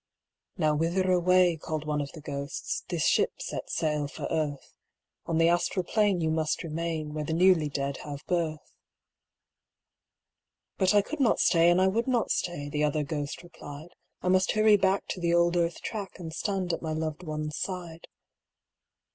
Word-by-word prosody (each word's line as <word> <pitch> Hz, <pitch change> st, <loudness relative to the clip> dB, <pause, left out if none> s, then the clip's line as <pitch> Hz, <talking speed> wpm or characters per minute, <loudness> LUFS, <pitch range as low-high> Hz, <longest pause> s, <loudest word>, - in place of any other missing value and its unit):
'Now 155 Hz, -4 st, +2 dB
whither 175 Hz, +5 st, +1 dB
away'—called 175 Hz, -4 st, +2 dB
one 150 Hz, -1 st, 0 dB
of 140 Hz, -, -5 dB
the 160 Hz, -, -10 dB
ghosts, 140 Hz, -1 st, -4 dB
'This -, -, -1 dB
ship -, -, +2 dB
sets -, -, -5 dB
sail 150 Hz, -3 st, 0 dB
for -, -, -7 dB
Earth. 145 Hz, -3 st, -2 dB, 0.5 s
On 165 Hz, -, 0 dB
the 165 Hz, 0 st, +5 dB
astral 175 Hz, +2 st, +1 dB
plane 205 Hz, -1 st, +1 dB
you 160 Hz, -1 st, +1 dB
must 160 Hz, +1 st, 0 dB
remain, 160 Hz, -1 st, -3 dB
Where 155 Hz, 0 st, -3 dB
the 160 Hz, +2 st, -2 dB
newly 175 Hz, -3 st, +4 dB
dead 140 Hz, -1 st, -2 dB
have 145 Hz, -1 st, -8 dB
birth.' 165 Hz, -4 st, -2 dB, 2.1 s
'But 190 Hz, +1 st, +3 dB
I 205 Hz, -, +5 dB
could 310 Hz, +8 st, -6 dB
not 250 Hz, -5 st, +3 dB
stay 170 Hz, -1 st, +5 dB
and 175 Hz, +1 st, +4 dB
I 190 Hz, -, +4 dB
would 230 Hz, +6 st, 0 dB
not 245 Hz, -4 st, +1 dB
stay,' 160 Hz, -5 st, -2 dB
The 150 Hz, +1 st, -1 dB
other 150 Hz, 0 st, +1 dB
ghost 145 Hz, +2 st, -4 dB
replied; 155 Hz, -2 st, -10 dB, 0.3 s
'I 180 Hz, -, +1 dB
must 185 Hz, 0 st, +3 dB
hurry 215 Hz, 0 st, +5 dB
back 195 Hz, 0 st, +2 dB
to -, -, -3 dB
the 170 Hz, 0 st, +2 dB
old 170 Hz, 0 st, +3 dB
Earth 170 Hz, -1 st, 0 dB
track 205 Hz, -4 st, -5 dB
And 165 Hz, -3 st, -7 dB
stand 190 Hz, -2 st, -1 dB
at -, -, -3 dB
my 160 Hz, -1 st, -3 dB
loved 155 Hz, 0 st, -3 dB
one's 155 Hz, -2 st, -4 dB
side. 175 Hz, -3 st, -5 dB
165 Hz, 175 wpm, -28 LUFS, 150-185 Hz, 2.1 s, the